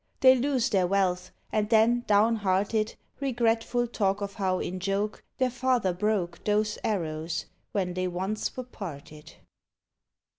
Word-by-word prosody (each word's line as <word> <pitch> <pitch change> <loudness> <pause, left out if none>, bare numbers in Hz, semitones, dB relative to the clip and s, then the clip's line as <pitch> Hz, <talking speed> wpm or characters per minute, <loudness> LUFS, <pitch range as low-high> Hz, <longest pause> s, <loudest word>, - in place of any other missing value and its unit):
They 260 -1 +9
lose 260 -1 +1
their 190 -4 +3
wealth, 180 -1 +1 0.2
and 215 -1 0
then, 235 +2 +4
downhearted, 210 0 +2 0.2
Regretful 240 -2 +1
talk 200 -4 0
of 200 -1 -4
how, 190 -2 0
in 185 0 -3
joke, 195 +3 -2
Their 255 -1 +1
father 245 -6 +1
broke 180 -3 -1
Those 210 0 +1
arrows, 160 -5 -2 0.3
when 185 -3 -1
they 185 0 -1
once 190 +7 -3
were 255 - -3
parted. 155 - -9
205 Hz, 135 wpm, -28 LUFS, 185-230 Hz, 0.3 s, They